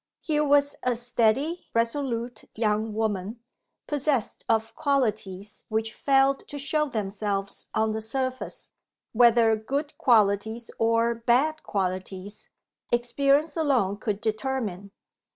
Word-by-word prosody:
Here 300 -2 +1
was 285 0 +3
a 250 -1 +1
steady, 245 +7 0
resolute 235 -1 -1
young 215 0 0
woman, 215 0 -2 0.5
possessed 285 -5 -1
of 225 0 +1
qualities 215 -8 -1
which 220 0 -1
failed 270 +1 +2
to 290 - -6
show 300 +2 0
themselves 200 -3 -3
on 220 0 +2
the 220 0 -3
surface 255 +3 -3 0.4
whether 230 -1 +5
good 280 +7 -3
qualities 220 -3 +2
or 230 +1 +3
bad 255 +7 +1
qualities 190 +1 -4 0.4
experience 275 +5 +2
alone 255 - +1
could 210 -2 -3
determine. 220 -4 -2
230 Hz, 110 wpm, -26 LUFS, 215-275 Hz, 0.5 s, whether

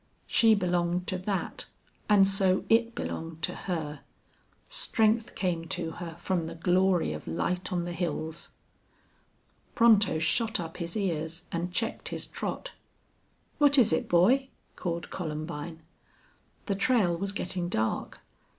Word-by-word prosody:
She 225 -2 +5
belonged 180 -2 0
to 185 - -1
that, 190 0 -3 0.4
and 200 -2 +6
so 195 -1 +2
it 230 +1 +3
belonged 165 0 -5
to - - 0
her. 155 -5 -4 0.7
Strength 225 +1 +1
came 170 -3 -1
to 165 -1 -3
her 165 -1 -7
from 170 -1 -1
the - - -7
glory 180 - +2
of 75 - -8
light 175 - -2
on 175 -1 0
the 175 - -4
hills. 160 -2 -3 1.3
Pronto 215 -7 +5
shot 220 +8 +1
up 165 -2 -6
his 170 +3 -3
ears 165 -3 -2
and 175 +1 -2
checked 225 +5 -2
his - - -4
trot. - - -5 0.9
"What 290 -1 +6
is 230 -10 +6
it, - - 0
boy?" 245 +11 +4 0.3
called 170 -2 -4
Columbine. 160 -1 -5 0.8
The 200 - 0
trail 200 -3 +2
was 195 +3 -3
getting 180 -3 -2
dark. 110 -8 -2
180 Hz, 135 wpm, -29 LUFS, 165-200 Hz, 1.3 s, and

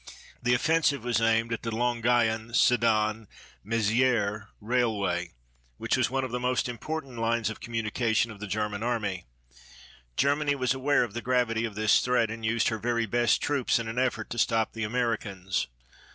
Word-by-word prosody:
The 125 0 +3
offensive 145 -2 +2
was 120 -2 0
aimed 115 +1 +2
at 115 - -3
the 115 - -3
Longuyon 115 -1 +1
Sedan 110 -3 +2 0.4
Mézierès 110 -1 +1
railway, 105 - -1 0.4
which - - 0
was - - +1
one 135 +1 -1
of 130 - -4
the 125 - -2
most 125 0 0
important 130 0 -5
lines 115 -1 0
of - - -9
communication 115 0 -1
of 105 - -11
the 105 - -6
German 105 0 -2
Army. 105 -7 -2 0.9
Germany 145 +1 +2
was 130 -1 +1
aware 135 +1 +2
of 115 -4 -5
the 120 - -4
gravity 120 -2 +1
of 110 -3 -6
this 110 0 +4
threat 125 -3 +1
and 115 0 -7
used 115 +1 +1
her 110 -1 -3
very 115 0 0
best 120 +1 +1
troops 140 -4 +1
in 115 -1 -4
an 115 +2 -2
effort 125 -4 -1
to 120 - -3
stop 110 0 +1
the 115 - -4
Americans. 105 - -2
115 Hz, 170 wpm, -27 LUFS, 110-125 Hz, 0.9 s, this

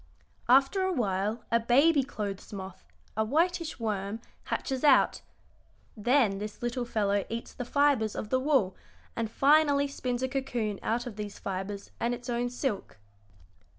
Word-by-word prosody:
After 270 +9 +5
a 375 0 +1
while 210 - -1
a 230 - +4
baby 275 +6 +4
clothes 205 -6 -5
moth, 190 -2 -8 0.3
a 220 - +2
whitish 325 +5 0
worm, 210 -1 -2 0.3
hatches 265 -2 -2
out. 285 -3 +5 0.7
Then 225 -3 +2
this 210 +2 -7
little 240 +1 -1
fellow 205 -3 +1
eats 230 +1 -5
the 245 - -5
fibres 275 -5 +2
of 210 - -4
the 260 - +2
wool, 260 -9 +2 0.4
and 230 -1 -2
finally 285 +2 +4
spins 255 -2 -3
a - - +2
cocoon 240 -6 -2
out 240 +2 -1
of 230 -4 -7
these 210 -1 -6
fibres 195 +1 -5
and 240 +1 0
its 245 +1 -7
own 240 +1 0
silk. 245 - -3
240 Hz, 150 wpm, -29 LUFS, 210-270 Hz, 0.7 s, After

